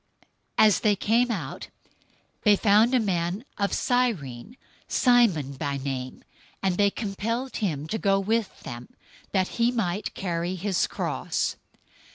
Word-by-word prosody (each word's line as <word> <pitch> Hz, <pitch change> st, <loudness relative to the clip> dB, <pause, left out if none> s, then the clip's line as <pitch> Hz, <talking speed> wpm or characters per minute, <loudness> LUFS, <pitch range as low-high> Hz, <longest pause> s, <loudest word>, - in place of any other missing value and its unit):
027:032 220 Hz, -, +7 dB
As 210 Hz, -, +4 dB
they 210 Hz, -2 st, +3 dB
came 230 Hz, +5 st, +2 dB
out, 165 Hz, -, -4 dB, 0.7 s
they 210 Hz, -2 st, +5 dB
found 220 Hz, +5 st, +4 dB
a -, -, +5 dB
man 185 Hz, +1 st, -1 dB
of 200 Hz, 0 st, +1 dB
Cyrene, 230 Hz, -, -1 dB, 0.3 s
Simon 220 Hz, -, +3 dB
by 140 Hz, +1 st, -3 dB
name, 130 Hz, -2 st, -5 dB, 0.4 s
and 185 Hz, -2 st, +1 dB
they 200 Hz, 0 st, +4 dB
compelled 230 Hz, +5 st, -3 dB
him 155 Hz, -9 st, -2 dB
to 220 Hz, +6 st, -2 dB
go 195 Hz, -1 st, +3 dB
with 220 Hz, +2 st, -1 dB
them, 120 Hz, 0 st, -8 dB, 0.4 s
that 190 Hz, -2 st, +2 dB
he 235 Hz, +1 st, +4 dB
might 205 Hz, -4 st, -2 dB
carry 175 Hz, -1 st, -2 dB
his 190 Hz, 0 st, 0 dB
cross. -, -, -2 dB
200 Hz, 140 wpm, -26 LUFS, 170-230 Hz, 0.7 s, 027:032